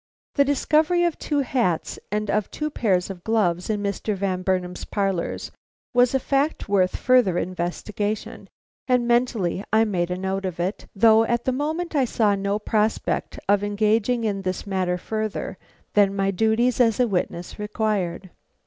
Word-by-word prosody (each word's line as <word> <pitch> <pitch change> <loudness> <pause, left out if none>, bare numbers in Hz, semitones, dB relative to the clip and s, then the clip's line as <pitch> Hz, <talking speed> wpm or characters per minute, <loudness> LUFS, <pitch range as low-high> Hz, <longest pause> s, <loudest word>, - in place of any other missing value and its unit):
The 280 - +4
discovery 310 +5 +2
of 345 -2 0
two 290 -2 0
hats 235 -11 -1
and 210 0 -1
of 210 -1 0
two 305 0 -3
pairs 195 -8 0
of 175 -2 -10
gloves 185 -6 +1
in 210 -1 -1
Mr. 200 +1 -2
Van 190 -1 -1
Burnam's 185 -1 -1
parlors 195 -4 -2 0.4
was 245 +1 +4
a - - +3
fact 280 +4 0
worth 190 -3 +2
further 245 -8 +3
investigation, 185 +4 -3 0.4
and 250 -2 +2
mentally 235 -7 +1
I 220 +1 +4
made 180 -5 -1
a 180 - -2
note 190 +1 -2
of 180 -2 -4
it, 185 +4 -3
though 220 +2 +6
at 235 +1 -1
the 260 - +2
moment 315 +6 -2
I 275 -3 +3
saw 220 -3 +2
no 200 +1 -1
prospect 215 0 -1
of 200 0 +3
engaging 215 +3 +1
in 200 -3 -1
this 185 -1 -3
matter 185 -2 -1
further 215 -1 -4 0.3
than 200 -1 +4
my 195 0 +1
duties 225 +5 +2
as 225 -2 +3
a 250 - +4
witness 180 -2 -3
required. 205 -4 -2
210 Hz, 165 wpm, -24 LUFS, 190-240 Hz, 0.4 s, though